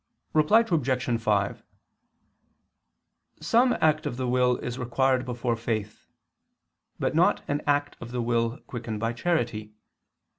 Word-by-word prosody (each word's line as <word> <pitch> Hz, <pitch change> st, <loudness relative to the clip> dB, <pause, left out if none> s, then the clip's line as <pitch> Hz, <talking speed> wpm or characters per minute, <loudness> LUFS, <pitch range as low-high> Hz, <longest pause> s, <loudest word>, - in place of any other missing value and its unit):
Reply 155 Hz, +9 st, +5 dB
Obj. 130 Hz, -, 0 dB
5: 105 Hz, -3 st, 0 dB, 1.8 s
Some 235 Hz, +11 st, +3 dB
act 155 Hz, 0 st, +2 dB
of 120 Hz, -, -4 dB
the 130 Hz, -1 st, -2 dB
will 125 Hz, 0 st, +2 dB
is 125 Hz, +1 st, -5 dB
required 130 Hz, +1 st, +1 dB
before 120 Hz, -1 st, -2 dB
faith, 110 Hz, -2 st, -4 dB, 0.9 s
but -, -, -1 dB
not 180 Hz, +6 st, +3 dB
an 145 Hz, +1 st, -1 dB
act 145 Hz, 0 st, +1 dB
of 120 Hz, -, -7 dB
the 125 Hz, 0 st, -2 dB
will 115 Hz, +1 st, 0 dB
quickened 115 Hz, -3 st, -5 dB
by 115 Hz, +1 st, -1 dB
charity. 115 Hz, -7 st, -2 dB
125 Hz, 125 wpm, -26 LUFS, 115-150 Hz, 1.8 s, Reply